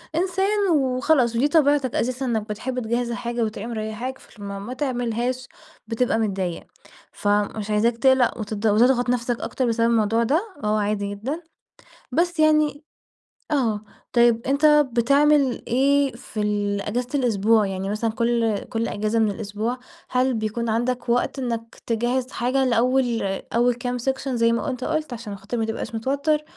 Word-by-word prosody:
إنسان 385 Hz, +3 st, +1 dB
وخلاص 260 Hz, -3 st, +2 dB
ودي 250 Hz, +5 st, +3 dB
طبيعتك 290 Hz, -4 st, +2 dB
أساسًا 255 Hz, +2 st, -1 dB
إنّك 220 Hz, -3 st, -1 dB
بتحب 245 Hz, +5 st, -3 dB
تجهِّز 240 Hz, +1 st, -1 dB
الحاجة 235 Hz, 0 st, -2 dB
وتبقى 215 Hz, 0 st, -4 dB
مريّحاك، 230 Hz, +3 st, -4 dB
فلمّا 200 Hz, -2 st, -8 dB
ما 215 Hz, +6 st, -6 dB
تعملهاش 255 Hz, -1 st, -2 dB, 0.4 s
بتبقى 225 Hz, 0 st, 0 dB
متضايق. 190 Hz, -5 st, -2 dB, 0.5 s
فمش 205 Hz, +1 st, -1 dB
عايزاك 225 Hz, +3 st, +2 dB
تقلق 260 Hz, -1 st, +3 dB
وت 215 Hz, 0 st, -4 dB
وتضغط 230 Hz, +4 st, +3 dB
نفسك 240 Hz, -1 st, 0 dB
أكتر 260 Hz, -, -2 dB
بسبب 230 Hz, 0 st, +2 dB
الموضوع 225 Hz, 0 st, +2 dB
ده 290 Hz, +9 st, +2 dB, 0.2 s
وهو 210 Hz, 0 st, +1 dB
عادي 205 Hz, -1 st, -1 dB
جدًا، 255 Hz, +11 st, -4 dB, 0.7 s
بس 345 Hz, +5 st, 0 dB
يعني 305 Hz, -1 st, +3 dB, 0.7 s
آه. 230 Hz, -8 st, +1 dB, 0.3 s
طيب، 235 Hz, -1 st, +4 dB
أنت 280 Hz, +3 st, +2 dB, 0.3 s
بتعمل 280 Hz, +2 st, +3 dB
إيه 275 Hz, +2 st, +3 dB
في 230 Hz, -3 st, -6 dB
ال 205 Hz, -1 st, 0 dB
إجازة 240 Hz, +5 st, -2 dB
الأسبوع؟ 220 Hz, -3 st, +3 dB
يعني 195 Hz, 0 st, -3 dB
مثلًا 220 Hz, +2 st, -1 dB
كل 230 Hz, -1 st, +1 dB
كل 230 Hz, -1 st, -2 dB
إجازة 215 Hz, +2 st, -1 dB
من 215 Hz, -2 st, +2 dB
الأسبوع، 215 Hz, +4 st, -3 dB, 0.3 s
هل 255 Hz, +1 st, +2 dB
بيكون 225 Hz, +1 st, -2 dB
عندك 240 Hz, +2 st, -1 dB
وقت 245 Hz, +3 st, +1 dB
إنّك 230 Hz, -3 st, -4 dB
تجهِّز 245 Hz, +3 st, -1 dB
حاجة 255 Hz, +3 st, 0 dB
لأول 245 Hz, 0 st, +2 dB, 0.3 s
أول 240 Hz, +1 st, +3 dB
كام 245 Hz, +1 st, -3 dB
سكشن 265 Hz, +1 st, -2 dB
زي 230 Hz, 0 st, +3 dB
ما 235 Hz, +4 st, -1 dB
أنت 255 Hz, -1 st, -4 dB
قُلت 310 Hz, -3 st, -2 dB
عشان 220 Hz, -3 st, -6 dB
خاطر 200 Hz, +5 st, -5 dB
ما 225 Hz, -, 0 dB
تبقاش 225 Hz, 0 st, -4 dB
متوتّر 280 Hz, +6 st, 0 dB
235 Hz, 150 wpm, -23 LUFS, 220-260 Hz, 0.7 s, طيب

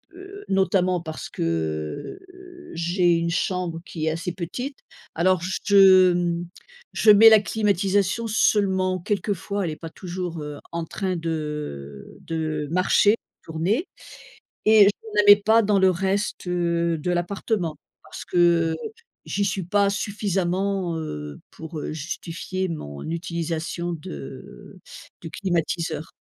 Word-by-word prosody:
heu, 390 Hz, +2 st, -11 dB
notamment 185 Hz, -2 st, +2 dB
parce 160 Hz, -2 st, -7 dB
que, 80 Hz, -, -3 dB
heu, 360 Hz, -1 st, -14 dB
j'ai 175 Hz, +1 st, +2 dB
une 170 Hz, 0 st, 0 dB
chambre 180 Hz, -2 st, -1 dB
qui 155 Hz, -2 st, -5 dB
est 160 Hz, -, +1 dB
assez 165 Hz, +2 st, -3 dB
petite. 245 Hz, -, -5 dB, 0.4 s
Alors 180 Hz, +1 st, +2 dB, 0.2 s
je, 190 Hz, -3 st, +7 dB
mmh, 175 Hz, -1 st, -1 dB, 0.5 s
je 220 Hz, -, +3 dB
mets 220 Hz, +2 st, +9 dB
la 220 Hz, -, +7 dB
climatisation 205 Hz, +1 st, 0 dB
seulement 190 Hz, -4 st, +2 dB
quelquefois, 200 Hz, +1 st, -2 dB
elle 160 Hz, -, -2 dB
est -, -, -5 dB
pas 165 Hz, -, -8 dB
toujours, 175 Hz, -1 st, -6 dB
heu, 150 Hz, -1 st, -7 dB
en 170 Hz, -1 st, -3 dB
train 185 Hz, +1 st, -3 dB
de, 165 Hz, 0 st, -4 dB, 0.8 s
heu, -, -, -15 dB
de 155 Hz, -2 st, -3 dB
marcher, 190 Hz, +4 st, +4 dB, 0.3 s
tourner 180 Hz, -, -1 dB, 0.8 s
et 215 Hz, -1 st, +7 dB
je -, -, +4 dB, 0.3 s
ne -, -, -6 dB
la -, -, +2 dB
mets 205 Hz, 0 st, +9 dB
pas 225 Hz, +2 st, +5 dB
dans 205 Hz, -1 st, +2 dB
le 190 Hz, 0 st, +5 dB
reste, 195 Hz, +2 st, -2 dB
heu, 170 Hz, -2 st, 0 dB
de 180 Hz, +4 st, -2 dB
l'appartement 175 Hz, -2 st, -2 dB, 0.3 s
parce -, -, -9 dB
que, 175 Hz, -, -2 dB, 0.4 s
heu, -, -, -4 dB, 0.5 s
j'y 200 Hz, -, -1 dB
suis 190 Hz, -1 st, -1 dB
pas 200 Hz, +3 st, +2 dB
suffisamment, 195 Hz, -3 st, -1 dB
heu, 75 Hz, -, -6 dB
pour, 160 Hz, -1 st, -8 dB
heu, -, -, -4 dB
justifier 170 Hz, +4 st, -4 dB
mon 70 Hz, -, -6 dB
utilisation 170 Hz, 0 st, -3 dB
de 70 Hz, -, -9 dB, 0.4 s
du 165 Hz, -, -7 dB
climatiseur. 165 Hz, -3 st, -2 dB
180 Hz, 140 wpm, -24 LUFS, 165-200 Hz, 0.8 s, mets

